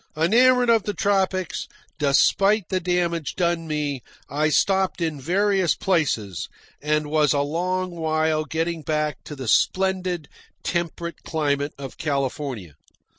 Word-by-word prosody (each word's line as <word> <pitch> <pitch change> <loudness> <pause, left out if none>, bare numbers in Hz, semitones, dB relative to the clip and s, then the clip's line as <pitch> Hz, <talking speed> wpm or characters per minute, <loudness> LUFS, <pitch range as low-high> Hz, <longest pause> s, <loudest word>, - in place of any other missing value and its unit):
Enamoured 245 +8 +4
of 225 -1 +4
the 205 0 -4
tropics, 190 -1 0 0.3
despite 195 +8 +3
the 185 - 0
damage 175 -3 -1
done 170 -2 0
me, 150 -4 -2 0.3
I 150 +2 +1
stopped 190 +5 +2
in 160 -4 -2
various 190 +2 +2
places, 115 - -1 0.3
and 150 +1 +1
was 150 -1 +2
a 140 - +2
long 180 +5 -1
while 155 -2 0
getting 165 +2 -2
back 150 0 -2
to 150 - -7
the 130 -3 -7
splendid, 185 - +1 0.4
temperate 170 0 -3
climate 145 -2 -1
of 135 -5 -9
California. 135 - -3
160 Hz, 125 wpm, -23 LUFS, 150-185 Hz, 0.4 s, Enamoured